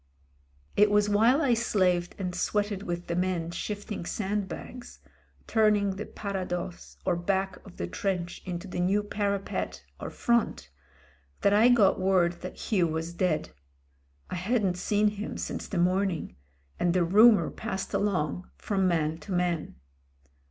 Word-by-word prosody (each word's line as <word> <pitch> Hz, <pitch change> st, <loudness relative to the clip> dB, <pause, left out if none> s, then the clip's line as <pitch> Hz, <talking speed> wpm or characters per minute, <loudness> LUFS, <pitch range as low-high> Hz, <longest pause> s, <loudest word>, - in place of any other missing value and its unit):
It 210 Hz, 0 st, +5 dB
was 210 Hz, 0 st, +3 dB
while 230 Hz, +9 st, +4 dB
I 255 Hz, -5 st, +4 dB
slaved 185 Hz, -6 st, +1 dB
and 180 Hz, -2 st, -3 dB
sweated 205 Hz, +2 st, -1 dB
with 175 Hz, -3 st, -4 dB
the 170 Hz, -, -2 dB
men 180 Hz, -2 st, -1 dB
shifting 205 Hz, +2 st, -4 dB
sandbags 210 Hz, +6 st, -4 dB, 0.2 s
— -, -, -34 dB
turning 210 Hz, -2 st, +4 dB
the 210 Hz, -, -6 dB
parados, 185 Hz, -3 st, -5 dB
or 175 Hz, -, +2 dB
back 190 Hz, +2 st, -1 dB
of 195 Hz, -, -14 dB
the -, -, -2 dB
trench 175 Hz, -, -3 dB
into 180 Hz, +1 st, -5 dB
the 180 Hz, -, -5 dB
new 195 Hz, +4 st, +2 dB
parapet, 200 Hz, -1 st, -2 dB, 0.2 s
or -, -, -5 dB
front 235 Hz, -, 0 dB, 0.3 s
— 70 Hz, +1 st, -34 dB
that 200 Hz, -, +4 dB
I 220 Hz, +4 st, +6 dB
got 220 Hz, -7 st, +4 dB
word 180 Hz, -2 st, +2 dB
that 185 Hz, -, -7 dB
Hugh 185 Hz, -5 st, +3 dB
was 160 Hz, +1 st, -3 dB
dead. 175 Hz, -3 st, 0 dB, 0.8 s
I -, -, -2 dB
hadn't 195 Hz, -1 st, 0 dB
seen 210 Hz, +3 st, +2 dB
him 210 Hz, +1 st, -3 dB
since -, -, -4 dB
the 200 Hz, -, -4 dB
morning, 180 Hz, -, 0 dB, 0.4 s
and 175 Hz, 0 st, +2 dB
the 180 Hz, -, +4 dB
rumour 215 Hz, +5 st, +6 dB
passed 195 Hz, -4 st, -5 dB
along 180 Hz, -4 st, -1 dB
from 195 Hz, -2 st, 0 dB
man 160 Hz, -2 st, 0 dB
to 200 Hz, -, -10 dB
man. 175 Hz, -3 st, -1 dB
190 Hz, 150 wpm, -28 LUFS, 175-205 Hz, 0.8 s, I